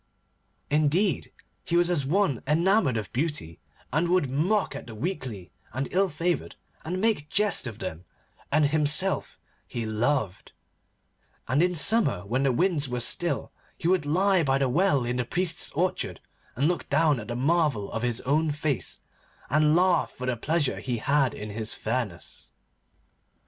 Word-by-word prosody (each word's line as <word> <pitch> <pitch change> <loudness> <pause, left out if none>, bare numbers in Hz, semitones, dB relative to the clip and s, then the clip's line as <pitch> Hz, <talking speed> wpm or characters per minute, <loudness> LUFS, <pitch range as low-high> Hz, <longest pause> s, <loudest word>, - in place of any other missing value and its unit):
Indeed, 155 +6 +1 0.3
he 170 - -2
was 175 0 +3
as 145 -6 +1
one 160 - +1
enamoured 165 - +3
of 105 -3 -5
beauty, 135 - -3 0.3
and 170 +3 +1
would 175 -7 +2
mock 185 +10 +1
at - - -8
the 115 - -9
weakly 120 - -5 0.2
and 130 +3 -2
ill 190 +1 +2
favoured, 170 +3 -2 0.3
and 180 +3 -3
make 205 -8 0
jest 205 -9 +1
of 110 -3 -7
them; 85 -3 -6 0.5
and 150 +1 +4
himself 150 +5 +2 0.3
he 115 -2 -4
loved, 110 -2 -1 0.9
and 130 +6 +2
in 180 0 +2
summer, 160 - +3
when 125 +6 -1
the 135 -1 +2
winds 150 0 +1
were 125 0 -2
still, 170 +8 0 0.3
he 165 - -3
would 180 -5 +2
lie 185 +4 +3
by 135 -3 +2
the 135 -1 +1
well 140 -1 +2
in 120 +1 -2
the 125 - 0
priest's 175 +6 0
orchard 180 +4 -1 0.4
and 140 +4 +1
look 175 0 -2
down 150 -2 +3
at 105 - -8
the 120 - -4
marvel 140 -5 +1
of 115 - -3
his 120 -1 0
own 155 +4 +1
face, 145 -2 -2 0.5
and 150 +1 +4
laugh 180 0 +3
for 125 - -8
the 125 -1 0
pleasure 150 +4 0
he 125 -2 -3
had 140 +1 +1
in 105 0 -7
his 110 +1 -1
fairness. 110 -7 -4
145 Hz, 165 wpm, -26 LUFS, 125-175 Hz, 0.9 s, and